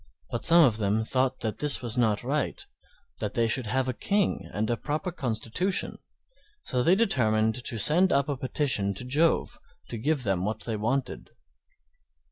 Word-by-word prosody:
But 120 - -4
some 170 -1 +8
of 115 -5 +2
them 105 +1 0
thought 130 +2 0
that 110 -2 -4
this 145 -3 +1
was 120 -1 0
not 115 -3 +1
right, 140 +4 -2 0.5
that 105 -1 -4
they 115 -1 +2
should 115 +1 +1
have 130 +3 0
a 130 - -1
King 200 - -1
and 105 +1 -2
a - - +1
proper 155 +9 -4
constitution, 130 - -2 0.6
so 125 - -1
they 170 +8 +4
determined 115 - +1
to 115 - -3
send 170 - +4
up 140 0 +2
a 145 - -2
petition 130 -7 0
to 125 - -4
Jove 150 +6 +1 0.3
to 115 - -5
give 145 +2 0
them 95 -4 -1
what 110 +2 -3
they 115 - -3
wanted. 120 +6 -3
125 Hz, 175 wpm, -27 LUFS, 110-150 Hz, 0.6 s, some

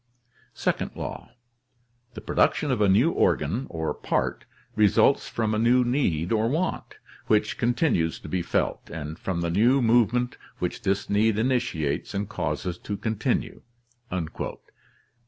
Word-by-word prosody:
"Second - - -1
law. - - -6 0.4
— 120 0 -42
The 110 - -7
production - - +1
of - - 0
a 100 - +4
new 115 - +4
organ 105 - +1
or 80 -1 -2
part - - -2 0.3
results 105 -4 +4
from 110 -2 -1
a 110 - +1
new 125 +2 +4
need 105 - 0
or 110 0 +2
want, 165 +7 -2 0.3
which 105 0 +2
continues 120 - +1
to - - -9
be 90 - -1
felt, - - -1
and 80 0 -6
from 90 -3 -2
the 85 0 -1
new 120 +9 +4
move 115 -2 +4
ment 125 0 -1 0.2
which - - -3
this 95 +1 0
need 105 +1 +2
initiates 110 - -1
and 100 +1 -1
causes 85 -1 -3
to 105 - -5
continue. 110 +4 -2
110 Hz, 145 wpm, -26 LUFS, 90-120 Hz, 0.4 s, a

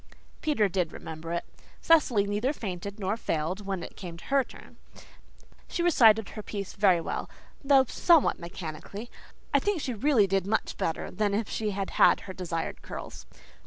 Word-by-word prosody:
Peter 285 -10 +2
did 180 -3 -1
remember 160 +1 -7
it. 170 - -2 0.3
Cecily 265 -11 +4
neither 210 +7 0
fainted 200 - -6
nor 195 +1 0
failed 185 0 -2
when 195 -3 -2
it - - -9
came 175 -4 -8
her 275 +9 +1
turn. - - -15 0.9
She 345 - -2
recited 225 - +5
her - - -12
little 210 - -9
piece 200 -2 -4
very 190 -4 +4
well, 165 - -4 0.3
though 275 -1 +5
somewhat 335 +3 +4
mechanically. 175 +5 -7 0.4
I - - +6
think 410 -4 0
she 260 -4 -3
really 235 -1 +3
did 195 -1 0
much 220 +2 0
better 160 - -2
than 205 -1 0
if 215 0 -1
she 215 -1 -2
had 195 -1 -3
had - - +6
her 190 - -8
desired 170 -3 -4
curls. - - -8
200 Hz, 170 wpm, -28 LUFS, 180-240 Hz, 0.9 s, I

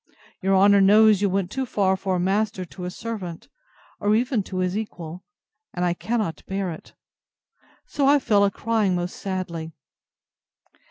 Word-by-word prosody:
—Your 195 +1 +2
honour 200 +1 +6
knows 210 +1 +6
you 200 - +2
went 190 -1 -1
too 265 - -2
far 190 -4 +1
for 190 0 -2
a - - 0
master 190 +1 0
to 180 +1 -9
a - - -3
servant, 185 -5 -7 0.5
or 205 +1 +2
even 245 0 +1
to 190 -1 -7
his 185 0 0
equal; 180 -5 -6 0.5
and 180 0 0
I 175 - +1
cannot 215 -2 -3
bear 195 -2 -2
it. 160 - -11 0.9
So 280 -2 0
I 285 +1 +6
fell 210 -7 +3
a 200 - +4
crying 210 -2 0
most 175 0 -3
sadly. 170 -4 -5
195 Hz, 165 wpm, -24 LUFS, 180-215 Hz, 0.9 s, honour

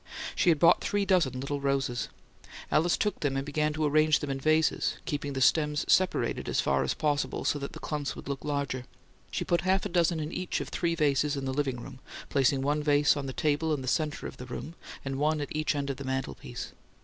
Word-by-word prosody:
She - - +3
had 160 - +5
bought 165 - +5
three 205 -1 0
dozen 170 -10 +2
little 140 +1 -3
roses. 135 -3 0 0.6
Alice 165 +3 +3
took 210 - -1
them 140 -3 0
and 135 - -2
began 150 +1 0
to 155 0 0
arrange 155 +1 +4
them 145 - -4
in 135 - -3
vases, 155 +3 +2
keeping 145 -1 -3
the 135 - -2
stems 150 +1 +3
separated 185 -1 +2
as - - +1
far 70 0 +2
as 65 - -1
possible 145 -2 -1
so 145 - +1
that 140 - -6
the - - -8
clumps 150 -3 -3
would - - -9
look 140 -1 -4
larger. 140 -3 -2 0.4
She - - -3
put 170 -1 +2
half 190 +2 +1
a - - -2
dozen 170 -2 +2
in 155 +1 -3
each 180 0 -2
of - - -5
three 170 -1 0
vases 145 -1 +2
in 135 - -3
the 130 - -1
"living 135 -3 -1
room," 130 +1 -10 0.3
placing 135 -1 +2
one 145 +2 +1
vase 145 0 +4
on 140 -2 -4
the - - -3
table 155 +2 +1
in 135 - -6
the - - -6
center 150 +3 -1
of - - -7
the 125 - -8
room, 130 +5 -6 0.3
and 135 0 -3
one 155 +1 +2
at 145 +1 -4
each 155 0 0
end 140 -1 -1
of 135 - -6
the 140 - -6
mantelpiece. 130 0 -4
145 Hz, 230 wpm, -29 LUFS, 135-155 Hz, 0.6 s, had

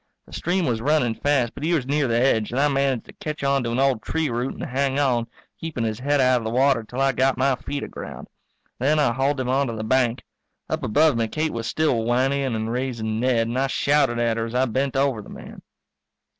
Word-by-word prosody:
The - - -17
stream 180 +1 0
was 115 -3 -1
running 135 -3 +2
fast 130 -2 0
but - - -10
he 165 +3 +1
was 140 -6 -1
near 145 +1 +1
the 115 0 +1
edge 115 -4 +2
and 125 - -2
I 145 - +4
managed 135 -3 0
to - - -14
catch 150 -2 -6
on 140 -1 +2
to 115 - -2
an 120 - -1
old 135 -4 +2
tree 160 +1 -1
root 120 +3 -2
and - - -7
hang 135 +1 -1
on, 125 -5 +1 0.3
keeping 160 -8 -4
his 110 -1 -2
head 145 +2 +1
out 130 -1 +4
of - - -8
the 110 - -2
water 130 0 +2
till 120 +4 -7
I 135 0 +3
got 135 0 +1
my 135 +1 +2
feet 140 +2 -5
aground. - - -8 0.5
Then 145 +5 +2
I 140 -6 +2
hauled 135 +3 0
him 130 - -2
onto 130 -3 +1
the 110 - -4
bank. 120 0 +1 0.4
Up - - -2
above 150 +6 +3
me 115 -1 0
Kate 155 +6 -2
was 115 0 -4
still 140 -7 +1
whinnying 130 +2 +1
and 110 +1 -2
raising 115 -3 -2
Ned 120 -2 +2
and 120 +3 -2
I 135 - +1
shouted 140 -3 +2
at 115 -1 +1
her 115 - -1
as 115 - -7
I 130 +1 +3
bent 130 +3 -1
over 135 -4 +1
the - - -13
man. - - -11
130 Hz, 240 wpm, -23 LUFS, 115-140 Hz, 0.5 s, I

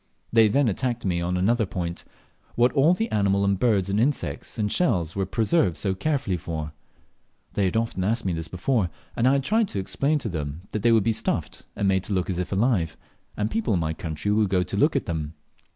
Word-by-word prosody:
They 115 -1 +6
then 135 +5 +2
attacked 120 +3 -1
me 90 -2 0
on 90 +1 -1
another 110 +4 +2
point 85 -2 -4 0.5
what 120 +1 +4
all 155 +6 +4
the 225 +4 -1
animals 100 -1 +2
and 100 -1 +1
birds 105 -6 +2
and 100 +2 0
insects 130 +1 -1
and 105 -2 0
shells 90 - +1
were 95 -2 -1
preserved 110 - +1
so 95 -2 0
carefully 130 -3 -1
for. 80 -2 -5 0.8
They 100 - +1
had 95 +4 0
often 115 -5 -1
asked 115 +3 0
me 95 - 0
this 80 -1 -4
before, 95 +3 0 0.3
and 120 - +2
I 130 - +5
had 140 -1 +1
tried 220 - +2
to 100 - -3
explain 140 +10 0
to 135 - -4
them 75 -2 -4
that 110 - -2
they 115 - +4
would 110 -3 +4
be 115 - +2
stuffed, - - -2
and 100 - 0
made 95 -1 +2
to 105 - -3
look 95 0 0
as 90 - -3
if 90 - -3
alive, 95 -6 +1 0.4
and 105 +1 -1
people 225 - 0
in - - +1
my 80 -1 -1
country 80 +4 -3
would 105 -1 +2
go 90 -1 +2
to - - -4
look - - +3
at - - 0
them. 80 -1 -4
100 Hz, 230 wpm, -25 LUFS, 90-120 Hz, 0.8 s, They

